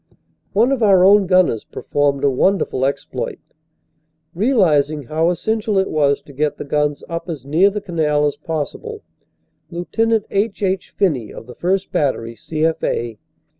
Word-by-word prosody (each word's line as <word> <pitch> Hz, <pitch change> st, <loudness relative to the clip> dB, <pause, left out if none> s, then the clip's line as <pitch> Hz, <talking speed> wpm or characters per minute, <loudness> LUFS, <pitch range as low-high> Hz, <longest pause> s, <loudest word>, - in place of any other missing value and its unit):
One 230 Hz, +6 st, +3 dB
of 270 Hz, -3 st, 0 dB
our 195 Hz, -4 st, +5 dB
own 200 Hz, 0 st, +6 dB
gunners 185 Hz, -, +3 dB
performed 145 Hz, -1 st, -1 dB
a 140 Hz, -, +4 dB
wonderful 135 Hz, -3 st, +1 dB
exploit. 135 Hz, -2 st, -4 dB, 1.0 s
Realizing 160 Hz, -, +2 dB
how 160 Hz, +6 st, 0 dB
essential 215 Hz, +3 st, -1 dB
it 190 Hz, -, +1 dB
was 145 Hz, -2 st, +1 dB
to 140 Hz, -, -14 dB
get 150 Hz, +2 st, -1 dB
the -, -, -6 dB
guns 150 Hz, 0 st, -1 dB
up 165 Hz, +1 st, -5 dB
as 145 Hz, -6 st, -6 dB
near 165 Hz, +8 st, +4 dB
the 205 Hz, +1 st, -4 dB
canal 150 Hz, -5 st, 0 dB
as 145 Hz, -, 0 dB
possible, 180 Hz, -, -5 dB, 0.7 s
Lt. 175 Hz, +5 st, -7 dB, 0.3 s
H. 205 Hz, +1 st, -1 dB
H. 190 Hz, -1 st, -1 dB
Phinney 145 Hz, -, 0 dB
of -, -, -10 dB
the 125 Hz, -, -11 dB
1st. 190 Hz, +5 st, -1 dB
Battery, 115 Hz, -5 st, -1 dB
C.F. 155 Hz, +7 st, -2 dB
A. 115 Hz, -2 st, -2 dB
160 Hz, 155 wpm, -19 LUFS, 145-195 Hz, 1.0 s, own